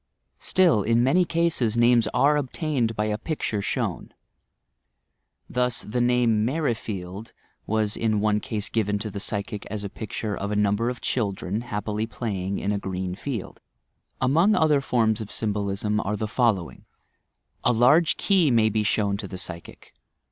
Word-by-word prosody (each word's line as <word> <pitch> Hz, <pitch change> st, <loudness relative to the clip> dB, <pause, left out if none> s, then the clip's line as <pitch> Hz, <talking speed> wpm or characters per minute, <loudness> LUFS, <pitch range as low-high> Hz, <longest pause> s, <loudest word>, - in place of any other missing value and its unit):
Still, 175 Hz, -, +3 dB
in 115 Hz, +3 st, +2 dB
many 175 Hz, +8 st, +3 dB
cases, 165 Hz, -9 st, +1 dB
names 120 Hz, 0 st, +4 dB
are 145 Hz, +2 st, +3 dB
obtained 135 Hz, -4 st, -1 dB
by 105 Hz, -, 0 dB
a 105 Hz, 0 st, -1 dB
picture 115 Hz, -8 st, -2 dB
shown. -, -, -3 dB, 1.4 s
Thus, 125 Hz, -2 st, -1 dB
the 120 Hz, +4 st, -2 dB
name 120 Hz, -3 st, +3 dB
"Merrifield" 110 Hz, -, -3 dB, 0.3 s
was 110 Hz, 0 st, 0 dB
in 110 Hz, -2 st, 0 dB
one 105 Hz, 0 st, +2 dB
case 105 Hz, 0 st, -3 dB
given 105 Hz, -3 st, 0 dB
to 105 Hz, +1 st, -5 dB
the 100 Hz, -, -5 dB
psychic 100 Hz, 0 st, -3 dB
as 105 Hz, 0 st, -5 dB
a 100 Hz, -, -4 dB
picture 110 Hz, 0 st, -4 dB
of 100 Hz, -, -4 dB
a 105 Hz, -, -1 dB
num 105 Hz, -1 st, +2 dB
ber 115 Hz, +2 st, 0 dB
of 125 Hz, -1 st, -6 dB
children, 100 Hz, -3 st, -2 dB
happily 105 Hz, -1 st, -3 dB
playing 100 Hz, -5 st, -3 dB
in 100 Hz, -, -1 dB
a 100 Hz, -, -1 dB
green 95 Hz, -1 st, -4 dB
field. 115 Hz, +1 st, -6 dB, 0.6 s
Among 165 Hz, +11 st, +3 dB
other 150 Hz, -3 st, +3 dB
forms 115 Hz, -4 st, +1 dB
of 105 Hz, -, -6 dB
symbolism 105 Hz, 0 st, -1 dB
are 105 Hz, 0 st, -2 dB
the 110 Hz, -, -2 dB
following: 110 Hz, -7 st, 0 dB, 0.8 s
A -, -, +4 dB
large 130 Hz, +8 st, +4 dB
key 185 Hz, -6 st, +3 dB
may 115 Hz, -3 st, +4 dB
be 110 Hz, 0 st, 0 dB
shown 105 Hz, -1 st, +1 dB
to 100 Hz, -1 st, -6 dB
the 95 Hz, -, -7 dB
psychic. 85 Hz, -2 st, -9 dB
110 Hz, 160 wpm, -25 LUFS, 105-125 Hz, 1.4 s, names